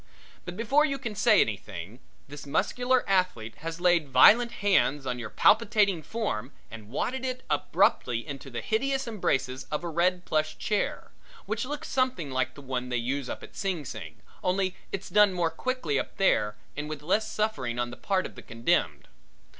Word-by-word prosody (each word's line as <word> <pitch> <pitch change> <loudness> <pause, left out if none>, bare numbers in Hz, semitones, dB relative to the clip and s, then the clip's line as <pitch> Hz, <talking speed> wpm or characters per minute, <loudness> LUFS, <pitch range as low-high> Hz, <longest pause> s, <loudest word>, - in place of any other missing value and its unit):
But 175 +1 -7
before 270 +7 +3
you 275 -3 0
can 235 -5 -5
say 210 0 +5
anything, 100 0 -4 0.3
this 145 +1 -9
muscular 245 - +1
athlete 180 - 0
has 165 +1 -6
laid 175 -4 +3
violent 230 - +6
hands 190 - +2
on 125 -1 -2
your 115 -3 -5
palpitating 205 - +3
form 150 - -3 0.2
and 110 -2 -10
wadded 255 - -2
it 255 0 -3
abruptly 115 -1 +1
into 140 -2 -7
the 120 - -5
hideous 270 +4 0
embraces 135 - -1
of 150 +2 -4
a - - -3
red 180 +2 +1
plush 155 0 0
chair, 210 -1 -2 0.3
which - - -2
looks 295 +3 -5
something 255 - 0
like 130 0 -1
the 145 - -11
one 125 -1 -3
they 125 - 0
use 130 +3 -2
up - - -6
at - - -12
Sing 180 -7 -2
Sing, - - -8 0.2
only 185 0 0 0.2
it's 195 0 -4
done 210 -2 +5
more 170 -2 0
quickly 255 - -1
up - - -6
there 105 - +2 0.2
and 150 +1 -4
with 150 -1 -6
less 215 +7 +1
suffering 135 - -1
on 120 0 -1
the - - -7
part 190 -2 0
of - - -7
the - - -11
condemned. 115 +1 0
175 Hz, 180 wpm, -28 LUFS, 130-215 Hz, 0.3 s, violent